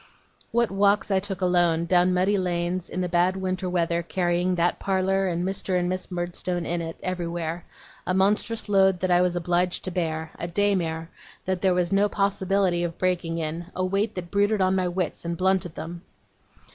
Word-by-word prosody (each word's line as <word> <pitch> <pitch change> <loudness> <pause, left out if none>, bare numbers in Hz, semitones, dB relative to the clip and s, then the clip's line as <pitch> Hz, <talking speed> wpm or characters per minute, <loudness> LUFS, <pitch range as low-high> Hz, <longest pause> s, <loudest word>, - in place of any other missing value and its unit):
What 235 -2 +1
walks 200 +1 +2
I 190 - +4
took 195 -1 -4
alone, 175 -2 +2
down 180 +1 +3
muddy 185 +3 +2
lanes, 180 -1 -1
in 185 - -3
the 180 - 0
bad 175 +2 +2
winter 185 -1 -2
weather, 170 -1 0
carrying 175 +1 0
that 175 0 +1
parlour, 195 0 +1
and 175 0 -1
Mr. 190 -1 0
and 175 0 0
Miss 185 0 -3
Murdstone 175 0 -3
in 170 0 -1
it, 165 0 -6
everywhere: 170 -2 -3 0.4
a 185 - +1
monstrous 210 +4 +1
load 190 -2 +4
that 185 -1 +1
I 175 0 +5
was 180 -1 +1
obliged 175 +1 0
to 185 - -4
bear, 160 -3 -2
a 170 - -3
daymare 170 -4 0 0.4
that 185 -1 -1
there 185 -2 +3
was 180 0 +1
no 200 +1 +3
possibility 195 -2 +1
of 170 -1 -3
breaking 175 -2 -1
in, 165 +1 -4
a 185 - 0
weight 195 +4 0
that 175 -2 -6
brooded 205 +1 +2
on 185 0 +3
my 185 -1 +1
wits, 180 -1 -2
and 170 0 -3
blunted 185 -2 +1
them! 170 +1 -7
180 Hz, 190 wpm, -25 LUFS, 175-190 Hz, 0.4 s, I